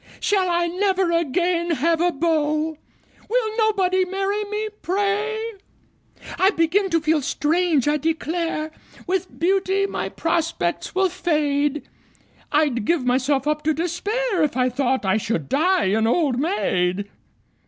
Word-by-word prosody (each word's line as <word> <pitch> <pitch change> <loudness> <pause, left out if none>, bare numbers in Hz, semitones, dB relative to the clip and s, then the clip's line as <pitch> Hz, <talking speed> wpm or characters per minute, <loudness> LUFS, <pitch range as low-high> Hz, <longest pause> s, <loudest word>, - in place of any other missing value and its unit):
Shall 385 -3 +1
I 345 0 +1
never 375 0 +1
again 340 +2 0
have 330 +1 +1
a 355 0 +3
beau? 310 0 0 0.5
Will 445 -2 0
nobody 380 -4 +2
marry 390 +3 -2
me, 425 +1 -3
pray! 410 +4 0 1.0
I 380 - +5
begin 380 +2 +1
to 335 -2 +2
feel 310 0 +2
strange, 310 0 +1
I 300 +1 +3
declare! 320 +1 -2 0.3
With 370 0 -2
beauty 385 +2 +1
my 395 - -3
prospects 330 - -2
will 380 0 +3
fade 300 -4 0 0.7
I'd 290 -7 +2
give 310 +2 0
myself 265 +2 +1
up 300 0 0
to 310 0 +1
despair 395 +5 -1
If 295 -5 0
I 255 0 +2
thought 260 -2 0
I 190 +2 +2
should 185 -9 -2
die 340 - +2
an 220 +1 +2
old 260 -1 +1
maid! 200 - 0
335 Hz, 135 wpm, -22 LUFS, 295-380 Hz, 1.0 s, I